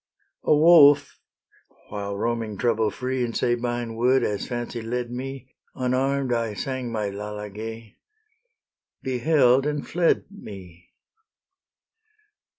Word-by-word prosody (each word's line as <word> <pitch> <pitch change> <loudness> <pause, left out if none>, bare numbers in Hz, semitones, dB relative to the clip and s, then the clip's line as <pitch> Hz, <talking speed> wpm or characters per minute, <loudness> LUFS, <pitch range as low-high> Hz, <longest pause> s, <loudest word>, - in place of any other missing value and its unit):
A - - +5
wolf, 145 -3 +6 0.7
while 100 -1 -4
roaming 115 -1 -2
trouble 115 -2 +1
free 130 +3 -2
In 115 -1 -3
Sabine 120 -1 -1
wood, 125 +2 +3
as 105 -3 -2
fancy 120 -1 -4
led 120 +1 -3
me, 130 +1 -7 0.2
Unarm'd 130 +1 0
I 115 -3 -1
sang 130 0 -4
my 105 -3 -2
Lalage, 105 +2 -7 1.1
Beheld, 130 0 +3
and 150 -1 -3
fled 170 0 +2
me. 95 - -12
120 Hz, 105 wpm, -24 LUFS, 110-130 Hz, 1.1 s, wolf